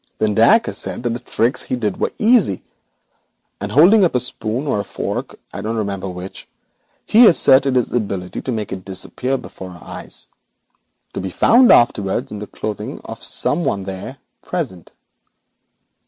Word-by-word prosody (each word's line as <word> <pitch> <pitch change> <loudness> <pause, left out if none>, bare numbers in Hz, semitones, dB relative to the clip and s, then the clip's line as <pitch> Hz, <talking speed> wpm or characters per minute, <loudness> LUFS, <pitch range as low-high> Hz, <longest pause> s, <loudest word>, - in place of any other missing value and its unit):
Then 110 -1 +1
Dacre 220 - +4
said - - -6
the 120 0 -2
tricks 120 0 0
he - - -3
did 105 -6 -2
were - - 0
easy, 215 - +3 1.0
and 100 +1 -5
holding 180 - +6
up 170 - +2
a - - +4
spoon 120 +1 -3
or 120 -8 0
a - - -1
fork, - - -5 0.2
I - - -5
don't 110 +3 -3
remember 100 -3 -3
which, 90 +1 -9 0.6
he 235 +3 +6
professed 140 -8 +6
his 130 -3 +1
ability 100 -6 -3
to 130 - -4
make 110 -3 -4
it 95 -1 -7
disappear 115 +8 -3
before 95 -6 -10
our 85 -2 -13
eyes, - - -7 0.9
to - - -4
be 95 - -4
found 235 - +5
afterwards 100 -5 +2
in 105 - -6
the 105 - -7
clothing 105 -2 -6
of - - -9
some 170 +4 0
one 100 -8 -1
there 95 +8 -7 0.2
present. 130 - -5
110 Hz, 165 wpm, -19 LUFS, 95-135 Hz, 1.0 s, holding